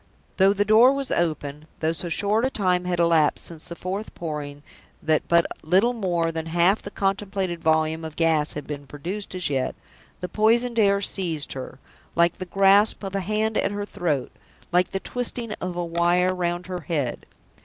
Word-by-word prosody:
Though 195 0 +6
the 205 0 +1
door 225 +5 +7
was 275 -1 -2
open 155 -3 -2
though 160 +1 0
so 170 +2 -4
short 205 +6 +1
a 260 - +2
time 180 -6 0
had 180 -1 -1
elapsed 165 -3 +3
since 165 -2 -6
the 170 - -6
fourth 195 +5 -5
Pouring 145 -3 -6 0.4
that 155 -1 0
but 170 0 +4 0.2
little 190 +9 +3
more 175 -7 0
than 160 0 -4
half 175 +5 +3
the - - -7
contemplated 195 -3 -2
volume 160 0 +1
of 160 -1 -7
gas 160 -2 +1
had 145 - -6
been 145 -1 -7
produced 185 +8 -6
as 180 -3 -1
yet 135 -2 -1 0.4
the 180 - -4
poisoned 230 +5 +2
air 200 -2 +4
seized 170 -7 -2
her, 130 -1 -7 0.4
like 170 0 +2
the 185 - -4
grasp 195 +4 +4
of 195 -1 -5
a 195 - 0
hand 215 +3 0
at - - +1
her 205 0 -4
throat, 170 -10 -2 0.4
like 180 +1 +3
the 195 - -3
twisting 240 0 -2
of 180 -1 -3
a 175 0 -2
wire 175 +2 +2
round 175 -1 -2
her 180 0 -4
head. 145 -8 -3
180 Hz, 185 wpm, -24 LUFS, 160-200 Hz, 0.4 s, door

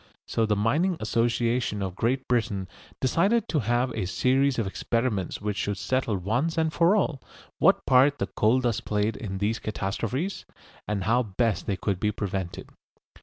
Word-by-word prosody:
So 115 -1 0
the 105 - +2
Mining 155 - +1
Association 115 -1 0
of 95 -2 -3
Great 130 +6 0
Britain 110 -6 0 0.3
decided 200 - +2
to 155 - +1
have 120 +2 +1
a 105 -6 -3
series 130 +7 +2
of 115 - 0
experiments 105 -1 -1
which 105 -1 -2
should 100 -1 -2
settle 125 -1 0
once 120 - -1
and 160 -1 +1
for 170 +4 +4
all 160 -10 0 0.4
what - - +4
part 135 +3 +5
the - - -1
coal 115 +5 +2
dust 120 -2 -1
played 105 +1 0
in 95 -3 -5
these 105 +3 0
catastrophes, 115 - -3 0.4
and 105 -2 -1
how 115 +5 +3
best 110 0 -1
they 100 - 0
could 95 -2 -2
be 105 +1 +1
prevented. 95 -4 -4
115 Hz, 170 wpm, -26 LUFS, 105-130 Hz, 0.4 s, part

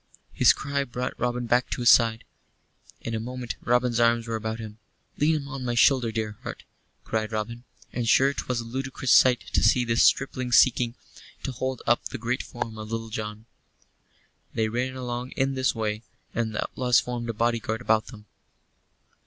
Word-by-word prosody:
His - - +6
cry 140 0 -2
brought 125 -1 -4
Robin 125 0 -1
back 120 +2 +2
to - - -3
his 120 - +7
side. 115 -1 +4 0.8
In 115 - -5
a 110 - -1
moment 125 +1 -5
Robin's 120 -1 +2
arms 115 0 +3
were 115 - -2
about 110 0 -3
him. 110 -1 -9 0.4
"Lean 150 -1 +2
on 135 -2 -6
my 120 -1 -1
shoulder, 120 -1 +4
dear 110 -2 -4
heart," - - -7 0.4
cried 110 -1 -2
Robin, 115 +3 -4 0.3
and 120 -2 -1
sure 135 +4 +5
'twas 125 -3 -3
a - - -3
ludicrous 130 +2 -3
sight 125 -2 +6
to - - +3
see 120 +3 +4
this 115 0 +2
stripling 130 -2 +2
seeking 120 -2 +4 0.5
to - - -2
hold 130 0 -4
up 120 - +2
the - - -4
great 125 +2 -2
form 115 -2 -6
of 110 0 -7
Little 115 0 -3
John. 110 0 -6 1.1
They 110 -1 +1
ran 125 +3 -2
along 125 0 -5
in 135 0 +1
this 130 -1 0
way, 105 -1 -2 0.3
and 115 -1 -1
the - - 0
outlaws 125 -1 +2
formed 120 -1 -4
a - - -1
bodyguard 115 0 -1
about 110 -2 +2
them. 105 -4 -12
120 Hz, 180 wpm, -26 LUFS, 110-125 Hz, 1.1 s, his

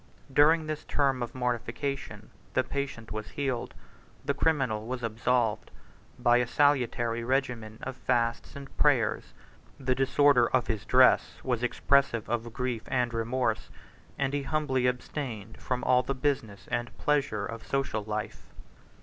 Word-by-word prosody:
During 155 +3 +5
this 155 -1 -4
term 135 -3 +1
of 120 - -4
mortification, 125 +2 -3 0.2
the - - +3
patient 140 -5 -4
was 110 0 -5
healed, 135 -4 -3 0.5
the 140 - +1
criminal 135 -8 0
was 125 0 -4
absolved, 115 0 0 0.5
by 120 0 +4
a 125 -1 +1
salutary 120 -5 +2
regimen 120 -4 -1
of 130 - -5
fasts 115 -2 -1
and 140 -1 -10
prayers: - - +2 0.4
the 130 -1 +1
disorder 135 -1 +4
of 130 -2 +2
his 110 -2 -3
dress 130 +2 +5
was 125 -3 -1
expressive 125 -1 +2
of 120 0 -2
grief 125 -1 -2
and 125 -2 0
remorse; 115 0 -1 0.5
and 140 0 -1
he 145 - 0
humbly 135 -3 0
abstained 125 -4 -4
from 125 -1 -2
all 125 0 +4
the 140 +2 -3
business 130 -7 -2
and 120 0 -3
pleasure 135 -9 0
of 115 +1 -8
social 135 -6 -1
life. 105 0 -5
125 Hz, 140 wpm, -29 LUFS, 115-140 Hz, 0.5 s, During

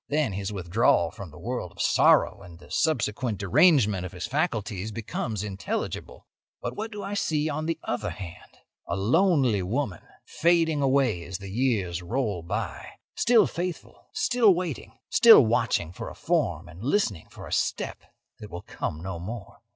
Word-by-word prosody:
Then 145 -7 +1
his 100 +1 -3
withdrawal 95 +3 +2
from 100 -6 -9
the 75 - -14
world 100 -1 -4
of - - -20
sorrow - - +4
and 85 -1 -12
the - - -17
subsequent 120 -6 0
derangement 105 - +4
of 90 - -7
his - - -4
faculties 105 -1 -2
becomes 110 -1 -4
intelligible. 100 -2 -4 0.3
"But - - -5
what 220 +2 -4
do 205 -2 -6
I 200 +1 -4
see 155 -6 0
on 155 +1 -3
the 165 - -1
other 120 - -2
hand? 90 -3 -10 0.3
A - - -1
lonely 130 - +3
woman 105 - -2 0.2
fading 165 -3 +2
away 130 -9 +2
as 90 +2 -5
the 100 0 -9
years 100 -7 0
roll 105 -1 -2
by; 85 - -4 0.3
still 235 -2 +5
faithful, 175 0 -5
still 235 -6 +4
waiting, 175 -6 -5
still 225 - +8
watching 110 -6 +1
for - - -6
a - - -11
form - - -1
and 85 +6 -11
listening 125 - 0
for - - -11
a - - -6
step - - -1 0.4
that 105 - -9
will 85 -2 -7
come 80 +2 -5
no 95 -3 -5
more. 105 +4 -8
110 Hz, 165 wpm, -26 LUFS, 95-155 Hz, 0.4 s, still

